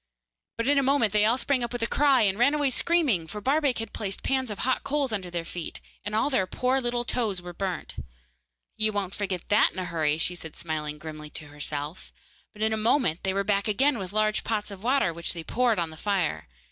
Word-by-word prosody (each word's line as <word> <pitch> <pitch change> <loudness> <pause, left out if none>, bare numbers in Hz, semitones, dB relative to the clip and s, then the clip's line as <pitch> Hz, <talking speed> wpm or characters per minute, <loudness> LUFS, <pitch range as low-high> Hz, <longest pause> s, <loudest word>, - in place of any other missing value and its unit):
But 230 - -1
in 285 0 +5
a - - +3
moment 270 -6 +2
they 210 0 +5
all 230 +3 +3
sprang 260 -1 +1
up 235 - -3
with 245 -1 -3
a - - +3
cry, 275 0 +4
and 200 0 +2
ran 280 +5 +4
away 290 -3 +1
screaming, 270 - +2
for 210 +5 -6
Barbaik 275 +3 +2
had 225 - -5
placed 195 -2 -2
pans 260 -2 0
of 210 - -5
hot 260 -1 +1
coals 280 -3 0
under 190 -4 -3
their 170 -1 -3
feet, 170 0 -6 0.2
and 205 +2 -3
all 225 +7 +2
their 190 -8 +2
poor 255 +6 +1
little 240 0 -1
toes 220 -7 -1
were 175 0 -8
burnt. 185 0 -4 0.8
'You 215 0 +1
won't 195 -2 -2
forget 190 -4 -3
that 210 +1 +5
in - - -7
a 185 - -2
hurry,' 155 -3 +1
she 170 +2 +3
said, 160 -3 -8
smiling 150 -2 -4
grimly 155 -1 -8
to 150 0 -6
herself, 145 +2 -5 0.4
but 215 -1 -5
in 220 0 +2
a - - 0
moment 215 - +2
they 190 - 0
were 195 +1 0
back 200 0 +1
again 255 +4 +2
with 185 -1 -5
large 215 0 +1
pots 210 -2 -2
of 195 -1 -9
water, 245 -6 +2
which 170 +1 -1
they 170 -2 -6
poured 240 +4 +2
on 170 -2 -1
the 155 - -11
fire. 170 - -1
210 Hz, 235 wpm, -27 LUFS, 175-245 Hz, 0.8 s, in